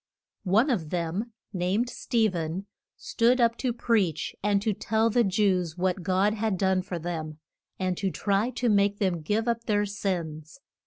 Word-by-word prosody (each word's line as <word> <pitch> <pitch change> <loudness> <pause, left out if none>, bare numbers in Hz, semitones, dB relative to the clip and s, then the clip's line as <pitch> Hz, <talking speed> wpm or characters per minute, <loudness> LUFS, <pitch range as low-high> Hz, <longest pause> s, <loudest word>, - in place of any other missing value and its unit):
One 225 +9 +4
of 165 -10 -1
them, 180 +7 -2 0.2
named 190 +6 0
Ste 230 -3 0
phen, 170 +2 -3 0.3
stood 245 +2 +2
up 230 -1 +3
to 255 - -1
preach 215 -9 0
and 205 0 +2
to 215 -1 +1
tell 220 +3 +1
the 240 +2 +3
Jews 185 -5 +1
what 185 +1 0
God 190 +3 +2
had 215 -3 -1
done 190 0 +2
for 180 -1 -5
them, 160 -2 -5 0.4
and 185 -1 -1
to 195 - 0
try 200 +4 0
to 250 0 -2
make 200 -2 +3
them 185 -5 0
give 210 +8 -1
up 235 0 -1
their 205 -1 +2
sins. 175 - -4
200 Hz, 170 wpm, -27 LUFS, 180-225 Hz, 0.4 s, One